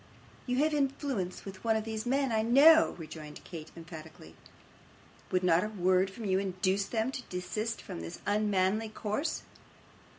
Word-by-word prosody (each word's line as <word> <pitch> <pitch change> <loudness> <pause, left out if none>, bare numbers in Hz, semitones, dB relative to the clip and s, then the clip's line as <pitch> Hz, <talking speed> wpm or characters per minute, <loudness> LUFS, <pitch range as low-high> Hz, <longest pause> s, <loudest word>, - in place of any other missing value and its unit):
'You 250 0 0
have 310 0 +2
influence 270 -9 -1
with 195 -1 -9
one 225 -1 +2
of 220 - 0
these 220 +1 -4
men, 270 0 +1
I 220 -1 +2
KNOW,' 285 +8 +6
rejoined 155 -2 -9
Kate, 160 -3 -8
emphatically. 160 - -10 1.0
'Would 185 0 +1
not 175 -1 +4
a 210 - -2
word 185 -2 +2
from 215 +3 -8
you 190 -1 +2
induce 195 0 0
them 225 +4 -1
to 265 - -5
desist 185 +6 -3
from 85 - -6
this 85 0 -7
unmanly 205 +1 +1
course? 215 +9 -2
205 Hz, 160 wpm, -31 LUFS, 180-230 Hz, 1.0 s, KNOW